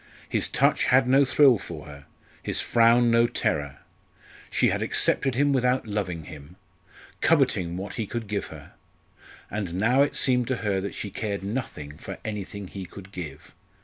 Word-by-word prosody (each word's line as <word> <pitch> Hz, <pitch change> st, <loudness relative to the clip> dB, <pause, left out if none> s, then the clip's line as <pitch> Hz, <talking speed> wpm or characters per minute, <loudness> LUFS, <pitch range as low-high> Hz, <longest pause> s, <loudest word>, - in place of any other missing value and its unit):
His -, -, 0 dB
touch -, -, +2 dB
had 130 Hz, 0 st, +4 dB
no 135 Hz, +2 st, +5 dB
thrill 130 Hz, -3 st, +5 dB
for 85 Hz, -5 st, -8 dB
her; 70 Hz, -1 st, -12 dB, 0.4 s
his -, -, -2 dB
frown 115 Hz, 0 st, +4 dB
no 115 Hz, 0 st, +4 dB
terror. 70 Hz, -10 st, -2 dB, 0.7 s
She -, -, +2 dB
had -, -, -1 dB
accepted 135 Hz, -3 st, +2 dB
him 145 Hz, +2 st, +2 dB
without 125 Hz, -1 st, +1 dB
loving 95 Hz, -6 st, -3 dB
him, 75 Hz, +1 st, -12 dB, 0.7 s
coveting 85 Hz, -1 st, +2 dB
what 95 Hz, +2 st, -6 dB
he 110 Hz, -, -3 dB
could 115 Hz, +1 st, -4 dB
give 100 Hz, -1 st, -3 dB
her. -, -, -12 dB, 0.8 s
And 100 Hz, -5 st, -3 dB
now 115 Hz, +8 st, +3 dB
it 145 Hz, -, +1 dB
seemed 125 Hz, -2 st, +2 dB
to 130 Hz, -, 0 dB
her 100 Hz, -2 st, +1 dB
that 100 Hz, -, -5 dB
she 100 Hz, -, -5 dB
cared 100 Hz, -2 st, -3 dB
nothing 95 Hz, -, -5 dB
for -, -, -7 dB
anything 100 Hz, -2 st, -5 dB
he 95 Hz, 0 st, -7 dB
could 95 Hz, +2 st, -12 dB
give! 75 Hz, -7 st, -8 dB
105 Hz, 170 wpm, -26 LUFS, 90-125 Hz, 0.8 s, no